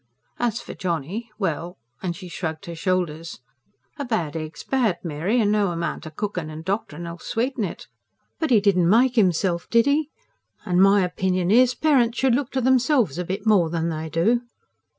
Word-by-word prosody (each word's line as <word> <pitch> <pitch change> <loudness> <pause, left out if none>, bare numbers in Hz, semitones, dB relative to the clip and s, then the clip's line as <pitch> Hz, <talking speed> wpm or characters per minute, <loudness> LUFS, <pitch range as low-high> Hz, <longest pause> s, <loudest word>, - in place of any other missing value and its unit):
As 240 -1 0
for - - -8
Johnny 180 - -3
well... 175 -3 -3 0.2
and 175 -2 -3
she 185 +1 -9
shrugged 160 -2 -5
her 170 - -6
shoulders. 165 -2 -2 0.6
"A - - -1
bad 195 - -2
egg's 155 0 -6
bad, 235 -9 +1
Mary, 170 +8 0
and 210 -2 +2
no 210 -1 +2
amount 170 -1 -3
o' - - -5
cooking 180 -1 -4
and 155 +1 -8
doctoring 175 -4 -3
'll 170 0 -7
sweeten 245 +1 -2
it. 180 - -5 0.5
But 320 - 0
he 235 -4 +6
didn't 185 -4 +3
make 245 +5 +4
'imself, 180 -4 +1
did 230 0 +4
'e? 290 +1 +2 0.6
and 180 -2 +2
my 195 0 +5
opinion 180 0 0
is, 250 +2 +5
parents 250 -5 +2
should 265 -2 +3
look 270 +1 0
to 265 - 0
themselves 250 - +2
a - - -1
bit 190 +4 -4
more 195 -7 +4
than 165 0 -1
they 160 0 -4
do." 180 +10 +2
190 Hz, 185 wpm, -23 LUFS, 170-235 Hz, 0.6 s, he